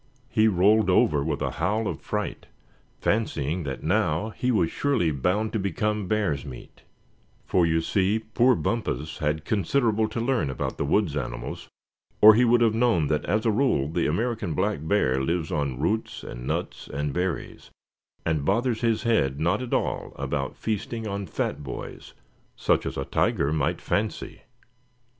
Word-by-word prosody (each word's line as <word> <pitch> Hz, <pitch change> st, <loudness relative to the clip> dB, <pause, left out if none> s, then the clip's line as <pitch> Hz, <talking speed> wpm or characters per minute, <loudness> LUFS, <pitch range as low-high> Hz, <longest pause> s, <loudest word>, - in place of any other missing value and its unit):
He 110 Hz, -1 st, +4 dB
rolled 105 Hz, +2 st, +4 dB
over 75 Hz, -5 st, +3 dB
with 75 Hz, -1 st, -2 dB
a -, -, -1 dB
howl 105 Hz, +7 st, -1 dB
of -, -, -4 dB
fright, -, -, -4 dB, 0.5 s
fancying 90 Hz, -7 st, 0 dB
that 65 Hz, -2 st, -5 dB
now 95 Hz, +1 st, +1 dB
he 125 Hz, -, -2 dB
was 95 Hz, -9 st, +2 dB
surely 130 Hz, -, +1 dB
bound 90 Hz, +10 st, 0 dB
to 110 Hz, -, 0 dB
become 100 Hz, +2 st, -1 dB
bear's 100 Hz, -10 st, 0 dB
meat; 65 Hz, -4 st, -11 dB, 0.6 s
for 90 Hz, -2 st, +2 dB
you 80 Hz, 0 st, +2 dB
see 95 Hz, +5 st, +1 dB
poor 115 Hz, +3 st, +2 dB
Bumpus 80 Hz, -, -2 dB
had 75 Hz, +1 st, -1 dB
considerable 110 Hz, -, +1 dB
to 110 Hz, +2 st, -4 dB
learn 120 Hz, -, 0 dB
about 65 Hz, -, -4 dB
the -, -, 0 dB
woods 80 Hz, 0 st, +1 dB
animals, 70 Hz, -4 st, -5 dB, 0.5 s
or 110 Hz, +1 st, +10 dB
he 120 Hz, +4 st, +4 dB
would 120 Hz, 0 st, +4 dB
have 115 Hz, -2 st, +4 dB
known 115 Hz, -10 st, +2 dB
that 75 Hz, -1 st, 0 dB
as 110 Hz, +2 st, 0 dB
a 110 Hz, -, +4 dB
rule 105 Hz, -, +2 dB
the 85 Hz, +2 st, 0 dB
American 110 Hz, -1 st, -1 dB
black 70 Hz, -, 0 dB
bear 75 Hz, -7 st, +1 dB
lives 80 Hz, +3 st, -1 dB
on 70 Hz, -6 st, -1 dB
roots 110 Hz, +9 st, -1 dB
and -, -, -7 dB
nuts -, -, -3 dB
and 70 Hz, 0 st, -3 dB
berries, 90 Hz, -2 st, -3 dB, 0.6 s
and 80 Hz, -3 st, 0 dB
bothers 115 Hz, -, +1 dB
his 115 Hz, -2 st, +1 dB
head 70 Hz, -, +1 dB
not 85 Hz, +8 st, +1 dB
at 125 Hz, -, -6 dB
all -, -, -1 dB
about -, -, -3 dB
feasting 110 Hz, +1 st, -3 dB
on 100 Hz, -1 st, -4 dB
fat 75 Hz, -, -2 dB
boys, 65 Hz, -, -8 dB, 0.4 s
such -, -, +1 dB
as -, -, -5 dB
a 70 Hz, -, -2 dB
tiger 70 Hz, +2 st, +1 dB
might 75 Hz, -4 st, 0 dB
fancy. 105 Hz, +1 st, -2 dB
95 Hz, 165 wpm, -26 LUFS, 75-110 Hz, 0.6 s, or